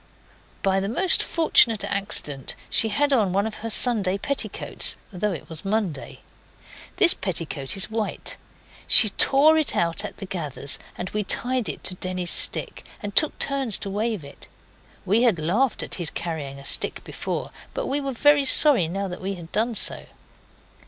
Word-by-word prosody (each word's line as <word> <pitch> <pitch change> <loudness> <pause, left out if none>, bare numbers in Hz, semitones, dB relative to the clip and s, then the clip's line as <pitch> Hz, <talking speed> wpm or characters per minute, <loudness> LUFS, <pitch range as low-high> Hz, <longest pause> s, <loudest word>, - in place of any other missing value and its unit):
By 195 0 +2
the 195 +1 -3
most 355 - +1
fortunate 240 -9 +3
accident 145 -9 -2 0.2
she 225 - +2
had 285 +7 +1
on 210 -8 +1
one 200 +2 +1
of 220 -1 -5
her 230 - -4
Sunday 210 -5 +5
petticoats, 280 +7 -1 0.2
though 200 +3 -2
it 165 - -7
was 160 +2 -7
Monday. 195 -8 -3 0.8
This 370 -4 +5
petticoat 165 -4 -3
is 195 - +1
white. 220 -1 -4 0.5
She 215 -4 +5
tore 300 +9 +4
it 305 - +1
out 170 -1 0
at - - -8
the 195 - -7
gathers, 150 -7 -2 0.2
and 180 - -6
we 210 0 -2
tied 250 +3 +1
it - - -7
to - - -2
Denny's 185 -1 -2
stick, - - +2 0.2
and 205 0 -6
took 310 - +3
turns 270 -6 +1
to 195 - -6
wave 215 -3 -2
it. 140 - -14 0.6
We 210 +5 +2
had 235 -7 +3
laughed 200 +12 0
at - - -7
his 165 - +1
carrying 150 -5 -6
a 140 - -12
stick - - 0
before, - - -5 0.2
but - - -3
we 290 -6 -1
were 275 -1 -3
very 290 +3 +3
sorry 265 - +4
now 195 +4 -4
that 180 - -8
we 195 +1 -3
had 170 -2 -12
done 225 +2 -1
so. - - -1
205 Hz, 175 wpm, -23 LUFS, 180-245 Hz, 0.8 s, Sunday